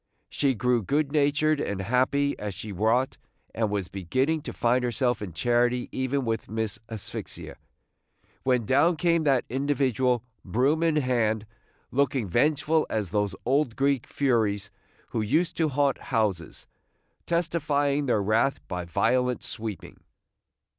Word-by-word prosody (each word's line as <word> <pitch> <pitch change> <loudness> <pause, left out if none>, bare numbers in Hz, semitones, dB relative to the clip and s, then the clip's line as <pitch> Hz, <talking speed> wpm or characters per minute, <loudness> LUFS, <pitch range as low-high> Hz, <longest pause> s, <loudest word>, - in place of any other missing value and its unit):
She 135 -3 +1
grew 120 +2 +2
good 145 +7 0
natured 150 +1 +2
and 100 -8 -2
happy 130 +7 +1
as 105 -2 -4
she 105 +2 -7
wrought, 110 +7 +1 0.4
and 110 -1 0
was 100 -3 -2
beginning 130 - -1
to - - -6
find 125 +1 +1
herself 125 -1 0
in 100 -4 -5
charity 120 +6 +1
even 130 +1 -1
with 115 -1 -2
Miss 110 0 -2
Asphyxia, 110 -3 -7 0.8
when 125 -3 +1
down 145 - +4
came 170 -1 +2
that 135 -4 +3
individual, 130 -2 +1 0.2
broom 130 - +1
in 165 -2 +2
hand, 115 -6 +1 0.5
looking 135 -4 +1
vengeful 155 - +2
as 105 -5 -2
those 105 -1 0
old 135 -1 +1
Greek 135 -2 +1
Furies 105 -7 0 0.4
who 115 - -1
used 155 +11 +1
to 160 -2 +2
haunt 140 -1 +1
houses, 105 - -2 0.6
testifying 145 -4 0
their 110 -5 +2
wrath 110 +7 +2
by 90 -1 -4
violent 120 +7 +1
sweeping. 110 -4 -6
125 Hz, 135 wpm, -26 LUFS, 110-140 Hz, 0.8 s, down